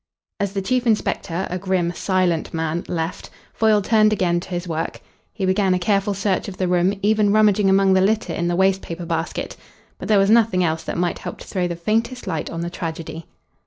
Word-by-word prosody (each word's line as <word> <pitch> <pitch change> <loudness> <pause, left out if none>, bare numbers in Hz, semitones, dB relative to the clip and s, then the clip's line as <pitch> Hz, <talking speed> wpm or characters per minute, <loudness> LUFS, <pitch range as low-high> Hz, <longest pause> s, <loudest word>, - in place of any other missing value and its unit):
As 200 -1 -1
the 195 -1 -2
chief 255 +3 0
inspector, 190 -4 0
a 180 - -2
grim, 180 -2 0
silent 180 -3 0
man, 160 +1 -2
left, 165 0 -4 0.2
Foyle 215 -2 +3
turned 215 0 +4
again 180 -4 +1
to 175 - -10
his 175 0 -4
work. 160 -1 -3 0.3
He 195 - -3
began 190 0 +2
a - - +1
careful 200 +2 0
search 195 -1 -1
of 195 - -7
the 185 - 0
room, 180 +2 +2
even 210 -1 +3
rummaging 210 -2 +4
among 195 0 +4
the 190 - +4
litter 215 +3 +1
in 170 - -1
the 175 - 0
waste 190 +1 +2
paper 170 +1 -6
basket. 165 0 -3 0.4
But - - -6
there 215 - +4
was 195 +1 +4
nothing 220 -5 +4
else 160 -1 0
that - - -4
might 175 0 -1
help - - -6
to - - -11
throw 180 -3 -1
the 170 - -4
faintest 225 +8 -1
light 160 - -3
on 165 - -5
the 170 - -3
tragedy. 165 -2 -6
185 Hz, 215 wpm, -21 LUFS, 175-205 Hz, 0.4 s, turned